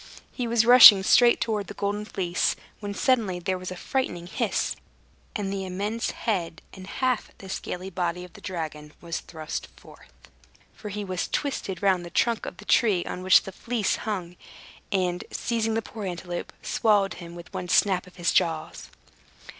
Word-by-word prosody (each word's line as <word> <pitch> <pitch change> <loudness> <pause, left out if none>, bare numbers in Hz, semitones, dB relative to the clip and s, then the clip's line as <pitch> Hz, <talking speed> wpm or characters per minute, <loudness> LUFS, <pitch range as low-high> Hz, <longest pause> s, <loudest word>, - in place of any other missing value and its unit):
He 245 -2 -3
was 230 -1 +3
rushing 230 -5 +10
straight 240 +4 +5
towards 215 -3 -1
the 205 - -8
Golden 205 +2 -2
Fleece, 185 -2 0 0.2
when 205 -1 -5
suddenly 225 -9 +1
there 185 +1 -2
was 185 - -6
a 185 - -6
frightful 175 -5 -2
hiss, 180 - -1 0.6
and 200 -2 -2
the 195 -1 -3
immense 205 +5 -2
head 180 -7 -3
and 190 -1 -10
half 255 0 -1
the 195 - -11
scaly 190 0 -5
body 180 -1 -2
of 180 - -12
the 210 - -14
dragon 155 -5 -6
was 170 -1 -4
thrust 155 -1 -6
forth - - -16 0.6
(for 210 - -8
he 205 +1 -4
was 185 -2 -2
twisted 200 - -3
round 190 -3 +3
the 175 - -8
trunk 230 +4 0
of 180 - -7
the 210 - -12
tree 200 -7 +3
on 180 - -5
which 185 0 +6
the 195 - -7
Fleece 230 +1 -1
hung), 180 -5 -4 0.5
and 180 -2 0
seizing 225 -2 -1
the 225 - -1
poor 215 -1 -8
antelope, 175 -1 -5
swallowed 205 -4 +2
him 170 0 -9
with 175 +3 -11
one 185 -2 -5
snap 185 -1 +3
of 180 - -16
his 175 -1 0
jaws. 160 -2 0
190 Hz, 180 wpm, -26 LUFS, 180-215 Hz, 0.6 s, rushing